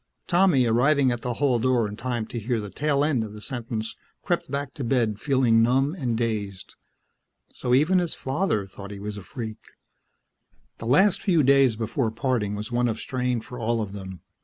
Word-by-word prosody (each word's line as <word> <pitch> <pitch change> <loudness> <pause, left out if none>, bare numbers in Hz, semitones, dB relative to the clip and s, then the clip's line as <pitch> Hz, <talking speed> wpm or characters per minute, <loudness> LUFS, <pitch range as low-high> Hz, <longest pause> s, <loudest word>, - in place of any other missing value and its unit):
Tommy, 175 -8 +4
arriving 130 +4 +3
at 120 -1 -3
the 125 -1 -3
hall 130 -3 +2
door 120 -2 +2
in 105 - -7
time 120 -1 -3
to 120 - -5
hear 115 +1 -1
the 105 -2 -6
tail 145 -1 +1
end 135 -7 +1
of 105 -1 -7
the 105 - -9
sentence, 115 -2 -4 0.3
crept - - -1
back 140 -1 -3
to 140 - -5
bed 115 -4 +1
feeling 130 -5 +3
numb 135 +5 +2
and 125 -10 -2
dazed. 105 -5 -3 0.8
So 125 0 +1
even 160 +7 +4
his 175 -3 -1
father 135 - -1
thought 100 +1 -10
he 100 - -7
was 105 +1 -5
a - - -6
freak. 110 -2 -6 1.2
The 115 - -6
last 190 - +4
few 170 -7 +3
days 135 -3 +5
before 115 +2 -1
parting 110 -3 -1
was 105 +3 -6
one 120 0 +2
of 115 -1 -1
strain 125 -2 -1
for 125 +1 -9
all 115 0 0
of 105 -3 -4
them. 95 -2 -8
120 Hz, 195 wpm, -25 LUFS, 110-135 Hz, 1.2 s, days